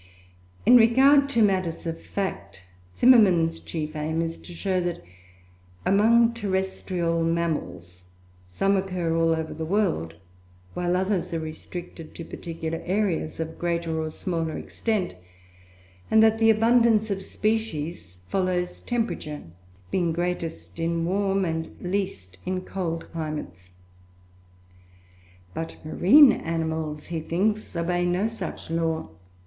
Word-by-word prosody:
In 245 +3 +8
regard 270 +5 +5
to 235 -5 +3
matters 185 -5 0
of 165 -1 -4
fact, 100 - -5 0.3
Zimmermann's 180 -10 +5
chief 155 -2 -5
aim 160 +2 -1
is 165 0 -3
to - - -12
show 185 +1 -1
that 175 - -3 0.8
among 230 +4 +4
terrestrial 190 -5 -1
mammals, 160 - -2 0.5
some 195 - +1
occur 185 -4 -1
all 165 0 +3
over 160 -1 -4
the 160 - -5
world, 160 - 0 0.6
while 180 0 0
others 185 -1 -1
are - - -1
restricted 160 +1 -8
to 165 - -7
particular 165 -1 -5
areas 185 -5 -1
of 160 0 -5
greater 170 -2 -1
or 155 - -3
smaller 165 -2 -3
extent; 215 -6 -2 1.0
and 220 0 +6
that 220 0 +4
the 225 0 +5
abundance 225 -1 +4
of 195 0 -2
species 175 - -2
follows 180 -2 -1
temperature, 225 -11 -3 0.5
being 175 -3 +1
greatest 165 - -3
in 165 0 0
warm 195 +1 +1
and 160 -1 -4
least 180 - -3
in 185 0 -2
cold 175 -3 -4
climates. 150 - -5 1.8
But 165 0 -5
marine 250 - +7
animals, 160 -3 -3
he 165 - -1
thinks, 195 +6 -1
obey 175 +1 0
no 175 +3 +1
such 195 -7 -6
law. 165 - -1
175 Hz, 120 wpm, -25 LUFS, 160-200 Hz, 1.8 s, In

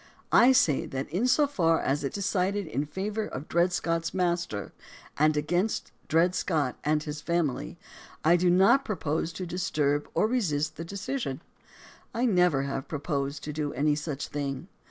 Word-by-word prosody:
I 245 +2 +7
say 165 - +3
that 135 +1 -4
in 200 +10 +1
so 290 +4 +4
far 165 - +2
as 140 +2 -1
it 140 - -1
decided 200 -1 0
in 145 -1 -2
favor 210 +6 -3
of 135 +4 -7
Dred 175 +2 +2
Scott's 165 -1 -1
master, 170 - -1 0.5
and 155 0 +4
against 175 +8 -1 0.2
Dred 170 +3 +3
Scott 155 -8 0
and 150 0 +1
his 150 -1 -5
family, 155 - -1 0.5
I 170 +2 +6
do 175 0 +3
not 190 +10 +5
propose 165 - -2
to 185 - -5
dis 180 +2 -3
turb 145 -1 +1
or - - +3
resist 155 - 0
the 165 - -6
decision. 200 - -4 0.7
I 240 +2 +1
never 180 - +3
have 135 -1 -4
proposed 140 -1 -3
to 150 - -5
do 150 -1 -2
any 150 +3 +2
such 150 -1 -4
thing. 145 +3 -4
165 Hz, 170 wpm, -28 LUFS, 145-185 Hz, 0.7 s, I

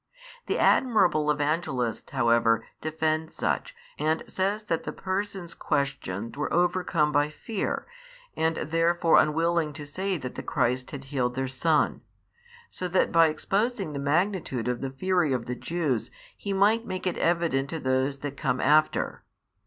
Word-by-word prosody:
The - - 0
admirable 180 - +3
Evangelist 145 -6 -1
however 115 -3 +3 0.2
defends 155 0 -1
such, - - -1 0.2
and 155 +1 +1
says 200 +3 -1
that 165 -6 -1
the - - -4
persons 190 -2 -4
questioned 115 -7 -2
were 150 +1 -2
overcome 175 -3 +2
by 145 0 +2
fear 195 +6 -3 0.5
and 160 0 +1
therefore 165 +2 +3
unwilling 165 0 +1
to 145 0 -8
say 185 +6 -2
that 125 -4 -6
the - - -5
Christ 125 +1 0
had 140 -1 -7
healed 125 -3 -1
their 135 0 -1
son: 150 +4 +1 0.7
so 185 - -4
that 185 +1 +2
by 165 -1 +6
exposing 195 +2 -1
the 140 - -3
magnitude 150 - 0
of 125 -1 -1
the 135 - -2
fury 175 +2 +1
of 120 -2 -2
the 125 - -3
Jews, 150 -4 -2 0.3
he 200 - -5
might 205 +4 +3
make 185 -5 -5
it 180 - -1
evident 165 -6 +1
to 165 - -3
those 130 +1 0
that 145 -1 -4
come 130 -3 -1
after. 155 +2 +2
155 Hz, 155 wpm, -27 LUFS, 135-175 Hz, 0.7 s, by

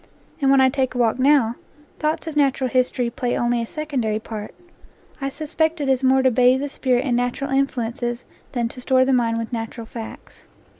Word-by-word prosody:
And 270 - +3
when 270 0 +6
I 260 - +6
take 260 -2 -1
a - - -2
walk 240 0 +2
now, 260 -4 +3 0.4
thoughts 310 +1 -1
of 320 -2 -5
natural 275 -3 +2
history 250 -1 +1
play 245 +1 -2
only 240 0 +1
a 230 - -4
secondary 265 -9 -2
part; 215 -1 -7 0.7
I 275 - -1
suspect 315 +3 -1
it 285 - -2
is 265 0 +1
more 265 0 +4
to 260 - +4
bathe 250 +2 +4
the 285 - -3
spirit 255 -1 0
in 250 -3 +1
natural 245 +3 -1
influences 245 -2 -1 0.3
than 240 -3 0
to 250 - -10
store 260 +1 +3
the 270 - +2
mind 230 -2 +2
with 230 +2 -4
natural 225 0 -5
facts. 225 0 -10
255 Hz, 200 wpm, -22 LUFS, 240-275 Hz, 0.7 s, when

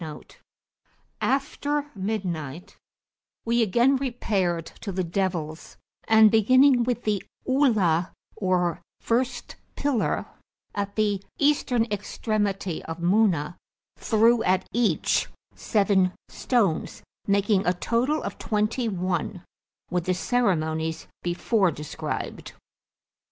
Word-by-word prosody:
[FN#1] 155 -2 -9 0.9
After 290 +1 -1
midnight 180 - -4 0.7
we 235 +1 +2
again 235 +6 +3
repaired 200 - -1 0.2
to 200 - -4
the 185 0 -1
Devils, 170 -3 -3 0.3
and, 220 -1 +7
beginning 255 +4 +5
with 245 -1 -1
the 210 -3 0 0.2
Ula, 215 - +2 0.2
or 180 -5 0 0.2
first 245 +3 -1 0.2
pillar, 280 -6 0 0.5
at 200 0 -3
the 205 -3 +1 0.2
Eastern 270 -5 +2
extremity 205 -3 -2
of 165 0 -5
Muna, 175 -3 +2 0.4
threw 230 +1 +3
at 185 -3 +1
each, 235 -1 +1 0.3
seven 195 -4 +2 0.2
stones 210 -11 0 0.2
(making 200 -1 +2
a 180 - +4
total 240 - 0
of - - -6
twenty 220 +2 0
one), 180 -1 -2 0.5
with 180 -1 -1
the 185 - +1
ceremonies 160 -8 0 0.2
before 185 +3 +1
described. 150 -1 -5
205 Hz, 100 wpm, -25 LUFS, 180-235 Hz, 0.9 s, and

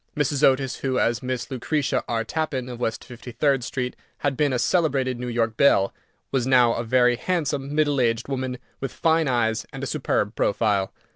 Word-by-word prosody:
Mrs. 145 -1 0
Otis, 135 -1 +3
who, 130 -2 -1
as 120 0 +1
Miss 130 -1 -4
Lucretia 135 +3 -1
R. 115 -1 -1
Tappan, 140 -1 -2
of 120 -1 -7
West 115 -2 -3
53d 125 +2 -1
Street, 125 0 -3 0.3
had 140 -1 +1
been 145 +1 +1
a 125 - +1
celebrated 135 -4 +1
New 125 - -4
York 115 -2 -1
belle, 100 -8 +4 0.4
was 130 -2 0
now 125 -3 +5
a 115 - -2
very 125 +1 +3
handsome, 145 -4 -2
middle 145 -3 +2
aged 115 -1 0
woman, 130 -2 -3 0.2
with 135 -2 -4
fine 160 -1 +2
eyes, 115 -3 +1
and 135 -1 -7
a - - 0
superb 130 -7 -1
profile. 100 -2 +1
130 Hz, 185 wpm, -24 LUFS, 120-140 Hz, 0.4 s, now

